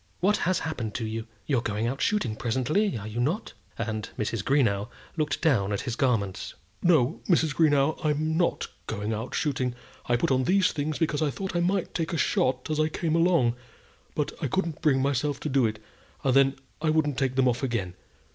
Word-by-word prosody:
what 205 Hz, +3 st, +3 dB
has 185 Hz, -1 st, +1 dB
happened 120 Hz, -10 st, -4 dB
to 115 Hz, -, -2 dB
you? 110 Hz, +1 st, -4 dB, 0.2 s
You're 130 Hz, -2 st, +1 dB
going 105 Hz, -1 st, -2 dB
out 130 Hz, +4 st, -2 dB
shooting, 205 Hz, -, +1 dB
presently; 130 Hz, -, 0 dB
are 105 Hz, -, -7 dB
you 110 Hz, +2 st, -4 dB
not?" 160 Hz, -, -1 dB, 0.2 s
and 110 Hz, -1 st, -3 dB
Mrs. 110 Hz, -1 st, -2 dB
Greenow 115 Hz, -6 st, +2 dB, 0.3 s
looked 155 Hz, -1 st, -1 dB
down 115 Hz, -11 st, +3 dB
at 100 Hz, -, -1 dB
his 120 Hz, -4 st, -3 dB
garments. 110 Hz, -8 st, 0 dB, 0.3 s
"No, 160 Hz, -5 st, +3 dB
Mrs. 160 Hz, -4 st, +3 dB
Greenow, 150 Hz, 0 st, +3 dB
I'm 155 Hz, +1 st, +1 dB
not 175 Hz, +1 st, +1 dB, 0.2 s
going 105 Hz, 0 st, -2 dB
out 110 Hz, +4 st, -4 dB
shooting. 130 Hz, -4 st, 0 dB, 0.3 s
I 120 Hz, -, +3 dB
put 120 Hz, -, +1 dB
on 130 Hz, -1 st, +2 dB
these 190 Hz, +4 st, +3 dB
things 150 Hz, +1 st, -2 dB
because 155 Hz, -3 st, 0 dB
I 155 Hz, -, +2 dB
thought 190 Hz, +6 st, -5 dB
I -, -, +3 dB
might 180 Hz, +1 st, 0 dB
take 165 Hz, 0 st, -2 dB
a -, -, 0 dB
shot 130 Hz, -2 st, +1 dB
as 155 Hz, -, 0 dB
I 155 Hz, 0 st, +3 dB
came 160 Hz, 0 st, -1 dB
along. 165 Hz, -9 st, +3 dB, 0.6 s
But 150 Hz, -, 0 dB
I 150 Hz, -, 0 dB
couldn't 165 Hz, +1 st, -2 dB
bring 135 Hz, -4 st, +3 dB
myself 140 Hz, +1 st, 0 dB
to 150 Hz, -, -2 dB
do 130 Hz, -4 st, +3 dB
it, 110 Hz, 0 st, -4 dB, 0.5 s
and 130 Hz, -, +3 dB
then 135 Hz, 0 st, +5 dB, 0.3 s
I 160 Hz, -, +1 dB
wouldn't 150 Hz, -3 st, +1 dB
take 130 Hz, -2 st, 0 dB
them 130 Hz, -1 st, +3 dB
off 120 Hz, -1 st, +1 dB
again. 115 Hz, -9 st, -2 dB
135 Hz, 205 wpm, -27 LUFS, 120-160 Hz, 0.6 s, then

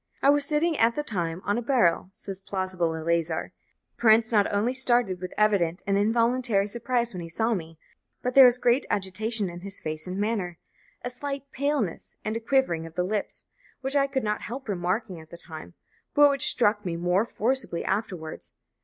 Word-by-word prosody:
"I 280 Hz, -, +7 dB
was 290 Hz, 0 st, +3 dB
sitting 315 Hz, +3 st, +1 dB
at 230 Hz, +1 st, +4 dB
the 295 Hz, -, -1 dB
time 175 Hz, -, -3 dB
on 205 Hz, +3 st, +1 dB
a -, -, -4 dB
barrel," 225 Hz, -9 st, +2 dB
says 195 Hz, -1 st, -7 dB
plausible 185 Hz, -4 st, -2 dB
Eleazar; 165 Hz, 0 st, -1 dB
"the -, -, -31 dB
prince 225 Hz, 0 st, +5 dB
not 205 Hz, -3 st, +3 dB
only 210 Hz, +5 st, +1 dB
started 240 Hz, -8 st, +2 dB
with 185 Hz, -, -5 dB
evident 195 Hz, -5 st, +2 dB
and 195 Hz, -, +1 dB
involuntary 230 Hz, 0 st, +2 dB
surprise 235 Hz, +2 st, -1 dB
when 180 Hz, -, -5 dB
he 165 Hz, -, -7 dB
saw 225 Hz, +7 st, +1 dB
me, 165 Hz, -5 st, -5 dB, 0.5 s
but 250 Hz, 0 st, -1 dB
there 270 Hz, 0 st, +9 dB
was 245 Hz, 0 st, +5 dB
great 245 Hz, +2 st, +2 dB
agitation 205 Hz, +2 st, -1 dB
in 175 Hz, 0 st, -7 dB
his 195 Hz, +2 st, -5 dB
face 155 Hz, +2 st, -5 dB
and 180 Hz, +1 st, -4 dB
manner 200 Hz, -5 st, -2 dB, 0.5 s
a 245 Hz, -, -2 dB
slight 275 Hz, +1 st, -6 dB
paleness 280 Hz, -, -2 dB
and 215 Hz, -, -2 dB
a -, -, -1 dB
quivering 225 Hz, -10 st, +1 dB
of 160 Hz, -, -14 dB
the 180 Hz, -, +1 dB
lips 205 Hz, +3 st, -3 dB, 0.4 s
which 270 Hz, +1 st, -1 dB
I 280 Hz, -1 st, +3 dB
could 270 Hz, -1 st, -2 dB
not 210 Hz, 0 st, -1 dB
help 260 Hz, +3 st, -7 dB
remarking 185 Hz, 0 st, -2 dB
at 160 Hz, 0 st, -14 dB
the 170 Hz, -, -10 dB
time, 160 Hz, 0 st, -10 dB, 0.4 s
but 290 Hz, 0 st, +7 dB
which 275 Hz, -1 st, +3 dB
struck 210 Hz, -3 st, +2 dB
me 175 Hz, -2 st, -3 dB
more 180 Hz, +4 st, +1 dB
forcibly 235 Hz, -5 st, -2 dB
afterwards 185 Hz, -6 st, -3 dB
210 Hz, 195 wpm, -26 LUFS, 180-245 Hz, 0.5 s, there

